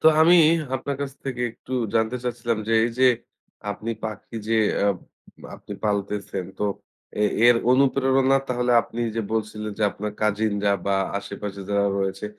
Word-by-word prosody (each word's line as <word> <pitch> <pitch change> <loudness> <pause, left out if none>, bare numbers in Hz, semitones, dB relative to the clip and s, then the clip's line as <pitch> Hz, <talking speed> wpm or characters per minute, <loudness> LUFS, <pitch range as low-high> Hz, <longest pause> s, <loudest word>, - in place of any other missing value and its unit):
তো - - +3
আমি 165 +3 +7 0.4
আপনার 135 +2 -3
কাছ 140 -1 -4
থেকে 130 -3 -3
একটু 125 - -12 0.2
জানতে 110 +2 +1
চাচ্ছিলাম 120 -2 -1
যে, - - +1
এই 120 - 0
যে 130 - +6 0.6
আপনি 110 +3 -4
পাখি 110 +1 -6
যে 115 - +2 0.3
আ - - +3 0.7
আপনি 105 - -10
পালতেছেন 100 -2 -2
তো - - -3 0.6
এ - - +5 0.2
এর 120 0 +7 0.2
অনুপ্রেরণা 135 0 +3
তাহলে 125 -1 +1
আপনি 120 - -7 0.2
যে - - +1
বলছিলেন, 110 -1 -2
যে - - -1
আপনার 105 +1 -5
কাজিনরা 105 -1 +1 0.2
বা 100 - +2 0.3
আশেপাশে 100 0 -7
যারা 100 0 +2
রয়েছে 95 +1 -2
110 Hz, 155 wpm, -24 LUFS, 105-125 Hz, 0.7 s, আমি